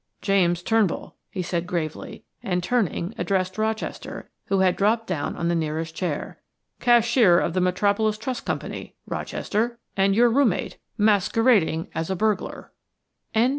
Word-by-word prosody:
"James 175 -3 +2
Turnbull," 220 -4 0
he 185 - -4
said 170 0 -2
gravely, 160 -4 -4 0.2
and 180 -2 -1
turning, 200 -3 0
addressed 185 0 -1
Rochester, 220 0 -3
who 195 -1 +1
had 185 -1 +3
dropped 220 +3 +2
down 145 - -3
on 170 - -2
the 170 - +2
nearest 160 0 -2
chair. 165 -3 -4 0.4
"Cashier 235 -6 +5
of 170 - -1
the 185 - +1
Metropolis 205 +4 +1
Trust 245 +3 -4
Company, - - -5
Rochester, 235 +3 -2 0.2
and 195 0 +3
your 240 +1 +5
roommate, 250 -6 +1 0.2
masquerading 205 -4 +3
as 160 +2 -3
a 190 - 0
burglar." 215 +2 -2 0.6
CHAPTER - - +4
II. - - +3
195 Hz, 145 wpm, -24 LUFS, 175-220 Hz, 0.6 s, Cashier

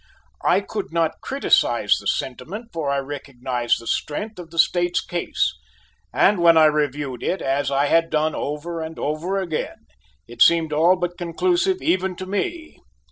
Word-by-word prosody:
I 190 - +3
could 205 -2 -5
not 165 -1 -1
criticise 275 +1 +2
the - - -7
sentiment, 230 +2 -4
for 160 -4 -2
I 140 - +1
recognized 130 -3 -2
the 115 - -12
strength 205 - -3
of 170 -2 -9
the 165 - -12
State's 175 +1 +2
case: 175 -1 -1 0.6
and 200 -1 +3
when 170 -1 +6
I 160 - +7
reviewed 145 -4 0
it, 185 - -1
as 135 +1 0
I 140 +1 +2
had 165 +3 +2
done 155 0 +1
over 160 +3 -4
and 160 0 -6
over 165 +7 -2
again, 170 -5 -4 0.4
it 120 0 -10
seemed 165 -2 +5
all 165 +5 +4
but 175 0 -4
conclusive 360 - 0
even 185 +1 +1
to 185 - -7
me. 320 - -4
165 Hz, 165 wpm, -22 LUFS, 145-185 Hz, 0.6 s, I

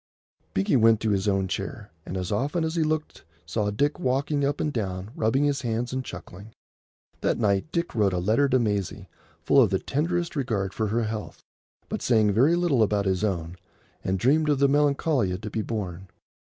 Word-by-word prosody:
Binkie 95 +8 +2
went 115 -2 +5
to 110 - +1
his 100 0 0
own 95 -1 +1
chair, 100 +2 -5 0.2
and 95 - -4
as 90 -1 -3
often 145 +11 0
as 160 0 -1
he 170 - 0
looked 155 0 -2 0.2
saw 105 +5 -1
Dick 145 - 0
walking 140 0 0
up 140 +1 0
and 150 - -1
down, 95 -2 -3
rubbing 110 +6 +1
his 140 -2 +1
hands 120 0 -2
and 130 0 -2
chuckling. 100 +1 -10 0.7
That - - 0
night 105 +6 +1
Dick 170 0 -2
wrote 105 -4 +2
a 90 - -1
letter 110 +10 +2
to 130 - +4
Maisie 105 -6 -2 0.4
full - - +5
of - - +4
the - - +1
tenderest 170 +4 -2
regard 110 -9 -1
for 110 +1 -1
her 115 +3 0
health, 110 -1 -5 0.4
but - - -4
saying 110 -4 +3
very 130 +11 +4
little 170 -8 +2
about 105 -2 +2
his 95 +1 0
own, 90 -4 -2 0.5
and 95 +1 0
dreamed 150 - +2
of 145 - +3
the 140 +1 +4
Melancolia 140 - +2
to 105 - -6
be 110 - -1
born. 95 -5 -5
110 Hz, 195 wpm, -26 LUFS, 100-140 Hz, 0.7 s, went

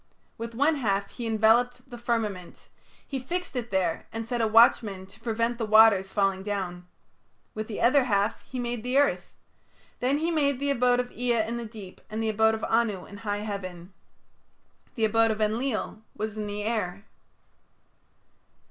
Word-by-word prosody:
With 230 0 -7
one 290 +5 +3
half 200 -6 -1
he 240 -2 -5
enveloped 235 +3 +2
the 245 -2 -9
firmament; 220 -7 -3 0.4
he 270 - -3
fixed 350 +5 -4
it 240 -2 -3
there 185 -5 -1
and 225 0 -4
set 240 +1 -2
a 225 - +2
watchman 215 -3 +4
to 200 +3 -17
prevent 230 +1 -1
the - - -1
waters 215 -3 +6
falling 195 -1 +1
down. 185 -3 -4 0.7
With 215 0 -5
the 215 - -5
other 255 +3 +4
half 205 -2 0
he 260 - -9
made 240 -2 -3
the 250 +3 0
earth. 285 0 +2 0.7
Then 260 +3 +1
he 325 +3 -1
made 280 -5 +1
the 280 0 0
abode 245 -1 +3
of 245 0 -2
Ea 240 -2 0
in 230 +2 -3
the 235 - -5
deep, 215 -4 -11
and 215 - -5
the 220 - 0
abode 220 +1 +3
of 220 - -8
Anu 225 -5 +1
in 200 - -11
high 205 -1 -3
heaven. 185 -3 -6 1.0
The 225 -3 +2
abode 225 +1 +3
of 220 -1 -1
Enlil 220 +1 -1 0.2
was 215 0 -3
in 210 -1 -4
the 205 0 -4
air. 205 -3 -2
225 Hz, 175 wpm, -27 LUFS, 205-245 Hz, 1.0 s, waters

